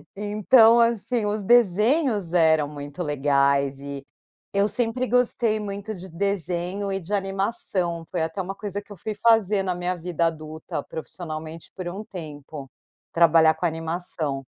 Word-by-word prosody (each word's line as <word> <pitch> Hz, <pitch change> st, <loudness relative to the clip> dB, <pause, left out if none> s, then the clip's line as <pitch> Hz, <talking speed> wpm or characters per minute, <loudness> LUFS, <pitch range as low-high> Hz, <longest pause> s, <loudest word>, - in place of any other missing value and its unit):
Então, 215 Hz, +3 st, +5 dB
assim, 230 Hz, 0 st, +1 dB
os 205 Hz, 0 st, -1 dB
desenhos 220 Hz, -, +3 dB
eram 160 Hz, -3 st, +4 dB
muito 145 Hz, +3 st, -6 dB
legais. 140 Hz, -1 st, +2 dB
E 140 Hz, 0 st, -6 dB, 0.5 s
eu 200 Hz, +1 st, +3 dB
sempre 245 Hz, +2 st, -1 dB
gostei 235 Hz, -3 st, +1 dB
muito 205 Hz, +1 st, -5 dB
de 185 Hz, +1 st, -10 dB
desenho 185 Hz, +1 st, -2 dB
e 195 Hz, -, -1 dB
de 185 Hz, +5 st, -7 dB
animação. 195 Hz, -3 st, -2 dB
Foi 175 Hz, -, -2 dB
até 175 Hz, +4 st, -3 dB
uma 190 Hz, +2 st, -5 dB
coisa 205 Hz, 0 st, -5 dB
que -, -, -27 dB
eu 205 Hz, -, -7 dB
fui 215 Hz, +5 st, -4 dB
fazer 210 Hz, -3 st, +3 dB
na 185 Hz, -1 st, -1 dB
minha 180 Hz, +1 st, -2 dB
vida 170 Hz, -1 st, -1 dB
adulta, 155 Hz, -2 st, -5 dB
profissionalmente 160 Hz, -1 st, -7 dB
por 185 Hz, -2 st, -5 dB
um 195 Hz, +4 st, -6 dB
tempo, 150 Hz, -6 st, -9 dB, 0.4 s
trabalhar 165 Hz, -1 st, +5 dB
com 175 Hz, -, -3 dB
animação. 160 Hz, -4 st, -3 dB
180 Hz, 150 wpm, -24 LUFS, 160-205 Hz, 0.5 s, Então